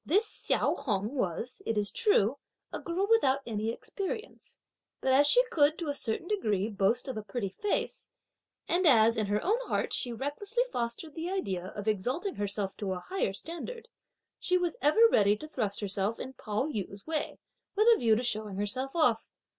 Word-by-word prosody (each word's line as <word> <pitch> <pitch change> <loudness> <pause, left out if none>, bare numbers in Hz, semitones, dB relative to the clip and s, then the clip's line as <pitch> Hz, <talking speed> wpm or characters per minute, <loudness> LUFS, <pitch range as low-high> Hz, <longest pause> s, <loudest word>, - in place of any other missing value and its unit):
This 405 +8 +3
Hsiao - - 0
Hung 210 0 -1
was, 240 - -2
it 225 - -1
is 205 -1 0
true, 285 - +2 0.3
a - - -3
girl 360 +3 -1
without 275 -12 +4
any 220 -1 -2
experience, 400 - -6 0.4
but 265 - +1
as 285 +2 +5
she - - +6
could, 300 0 +4
to 330 -4 -3
a - - 0
certain 255 +4 -3
degree, 215 - 0
boast 205 +5 +1
of 260 - -4
a - - -2
pretty 205 0 -3
face, 415 - -2 0.6
and 355 0 +2
as, 230 -4 +6
in 215 -2 0
her 205 +1 0
own 435 +6 +2
heart, - - -1
she 245 - -1
recklessly 295 - -1
fostered 235 +6 -3
the 330 +3 -4
idea 190 - -2
of 205 +1 -6
exalting 250 - -1
herself 205 -1 -2
to 195 -3 -2
a 180 - -4
higher 375 - 0
standard, 340 - -7 0.5
she 365 - +2
was 350 -2 -1
ever 440 +11 +6
ready 205 0 +4
to 310 - -8
thrust 215 -10 -3
herself 200 +2 -1
in 265 - -6
Pao 215 0 -2
yü's 200 -8 -5
way, 315 -1 -3 0.4
with 430 +2 +3
a - - 0
view 225 -2 +4
to 240 - -1
showing 215 -4 -2
herself 255 - -1
off. 245 -9 +2
250 Hz, 185 wpm, -30 LUFS, 210-335 Hz, 0.6 s, she